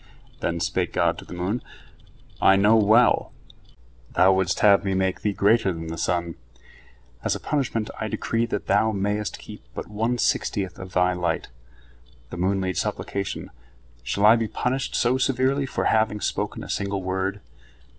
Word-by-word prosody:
Then 85 0 -2
spake 85 - -1
God - - +1
to - - -11
the - - -9
moon: 95 +7 -2 0.8
"I 95 - +6
know 105 +3 +5
well, 110 +3 +4 0.8
thou 95 +1 +5
wouldst 95 -2 0
have 100 -1 +6
me 95 -1 -1
make 95 -1 0
Thee 105 - 0
greater 100 +1 +3
than 80 -1 -6
the 80 - -4
sun. 85 0 -1 0.9
As - - 0
a - - -5
punishment 125 -7 -2
I 110 - -2
decree 115 +2 -1
that 105 - -3
thou 105 +3 +3
mayest 105 +1 -2
keep - - -11
but - - -5
one 115 +4 -1
sixtieth 95 -5 -1
of 95 -1 -9
thy 90 0 +3
light." 90 -1 -2 0.8
The - - -6
moon 95 +2 +1
made 95 -2 -2
supplication: 100 -1 -3 0.5
"Shall 100 +11 0
I 110 +2 +8
be 115 -1 -1
punished 130 +4 -2
so 125 +2 +2
severely 135 +1 +1
for - - -2
having 110 -1 +2
spoken 105 0 -3
a - - -8
single 100 -1 -2
word?" 95 +2 -2
100 Hz, 165 wpm, -24 LUFS, 95-110 Hz, 0.9 s, I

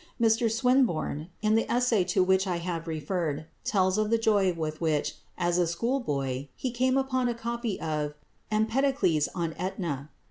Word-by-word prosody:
Mr 225 0 +3
Swinburne, 230 - +1
in 215 0 +3
the 225 - +1
essay 240 -5 +3
to 185 +1 +2
which 190 +1 +2
I 180 -2 0
have 170 -1 -4
referred, 155 -1 -2 0.2
tells 190 0 +2
of 215 0 +1
the 230 - +4
joy 205 -4 +3
with 155 -2 -4
which, 155 -3 0 0.2
as 175 0 +1
a 175 - +3
schoolboy, 145 - -1
he 255 - -3
came 255 +2 +2
upon 260 -2 +1
a 240 - -1
copy 235 -2 -3
of 150 -2 -2 0.3
"Empedocles 220 - +2
on 165 -2 -1
Etna." 165 -7 -3
190 Hz, 165 wpm, -28 LUFS, 160-235 Hz, 0.3 s, the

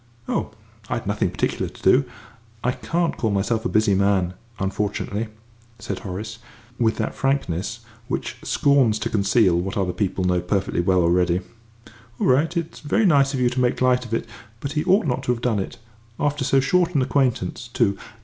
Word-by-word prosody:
"Oh, - - -1 0.4
I'd 120 -1 -2
nothing 100 +1 0
particular - - -1
to - - -16
do. - - +5 0.6
I 125 - +2
can't 165 +6 -1
call 110 - 0
myself 110 +3 0
a - - +1
busy 110 -1 +3
man 95 -2 +2 0.2
unfortunately," 105 +2 -2 0.5
said 115 0 -5
Horace, 110 +3 -6 0.4
with 110 -2 +2
that 110 - -2
frankness 135 -11 -1 0.3
which - - -3
scorns 135 -6 +3
to 105 - -3
conceal 100 -3 +3
what 95 +3 -3
other 90 -3 0
people 95 -3 -1
know 90 -1 +2
perfectly 95 0 0
well 90 0 +3
already. 90 +1 +2 0.5
"Ah, - - -17 0.3
well, 135 +5 +3
it's 170 -1 -3
very 210 +9 +1
nice 140 -5 +4
of - - -2
you 125 -1 +3
to 125 0 0
make 125 -1 +1
light 125 0 +3
of 120 - -10
it; 115 - -1 0.3
but 140 - -4
he 150 0 0
ought 195 +3 +4
not 130 -2 0
to 125 - +2
have 115 - -7
done 115 -4 +1
it 95 - -5 0.4
after 145 -1 0
so 135 0 +3
short 175 +5 +2
an 135 - +4
acquaintance, 125 -5 0
too. 100 -4 +1
115 Hz, 185 wpm, -23 LUFS, 100-135 Hz, 0.6 s, do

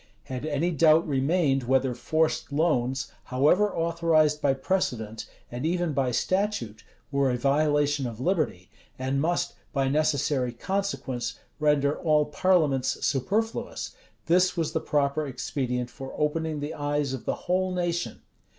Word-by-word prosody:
[] - - -36
Had 130 +4 -3
any 155 +4 0
doubt 160 0 +4
remained, 135 -1 +1
whether 130 0 +2
forced 155 +5 0
loans, 135 -4 0
however 150 +11 +3
authorized 165 -3 +2
by 135 -2 +3
precedent, 120 - -2 0.2
and 120 +2 -5
even 175 0 0
by 135 -2 +1
statute, 155 - -1 0.3
were 140 -1 +2
a 125 - 0
violation 145 +1 +2
of 115 -1 -7
liberty, 135 - -1 0.3
and 130 +1 -1
must, 175 +2 0 0.2
by 135 -2 +1
necessary 140 -3 +1
consequence, 190 -6 -3 0.2
render 150 -1 +2
all 150 -3 +3
parliaments 150 -5 +1
superfluous, 205 - -1 0.3
this 180 +2 +3
was 165 -2 0
the - - -1
proper 145 +1 0
expedient 125 -1 -3
for 135 -1 -8
opening 155 0 -1
the 145 +2 -4
eyes 145 -1 -1
of 130 - -6
the - - 0
whole 185 +1 +1
nation. 175 -9 -2
145 Hz, 140 wpm, -27 LUFS, 130-165 Hz, 0.3 s, doubt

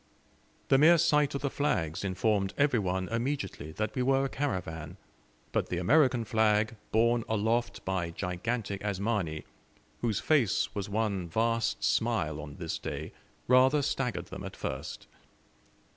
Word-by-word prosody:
The 135 - +5
mere 165 +4 +7
sight 150 -4 +3
of 140 - -2
the 140 - 0
flags 85 - -1
informed 100 +1 0
every 140 -5 +3
one 95 -1 -1
immediately 115 - -3
that 110 +4 -2
we 125 - -1
were 135 +1 +3
a - - -2
caravan, 90 - -4 0.5
but - - -1
the 90 - -2
American 120 - +3
flag 110 0 +2 0.2
borne 115 +1 +3
aloft 110 +2 0
by 95 -3 -1
gigantic 100 +4 -3
Asmani, 100 -6 -1 0.6
whose 115 -4 0
face 135 - +2
was 100 -1 -4
one 100 -4 -1
vast 115 +4 0
smile 75 -1 +1
on 75 0 -9
this 85 -2 -4
day, - - -5 0.3
rather 130 +3 +5
staggered 125 -5 -2
them - - -7
at - - -7
first. 65 +2 -5
110 Hz, 145 wpm, -30 LUFS, 95-130 Hz, 0.6 s, mere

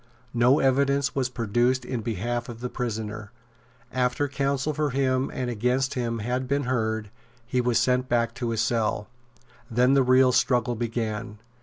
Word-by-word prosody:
No 125 +3 +4
evidence 140 +1 +2
was 130 -2 0
produced 120 +2 0
in 125 -3 -3
behalf 120 +3 -3
of 115 -1 -8
the 125 +1 -4
prisoner. 110 -3 -4 0.6
After 125 +3 +1
counsel 140 +1 -1
for 150 0 0
him 130 0 +1
and 125 - -3
against 125 +4 0
him 120 -2 -2
had 125 +4 -2
been 140 +2 0
heard, 110 -4 -1 0.3
he 125 +1 0
was 120 -2 +1
sent 125 +2 +1
back 115 -1 +1
to 120 - 0
his 115 -1 0
cell. 110 -3 0 0.6
Then 125 +3 +3
the 140 - +5
real 130 0 +5
struggle 125 -1 +2
began. 115 -1 -3
125 Hz, 160 wpm, -26 LUFS, 115-130 Hz, 0.6 s, the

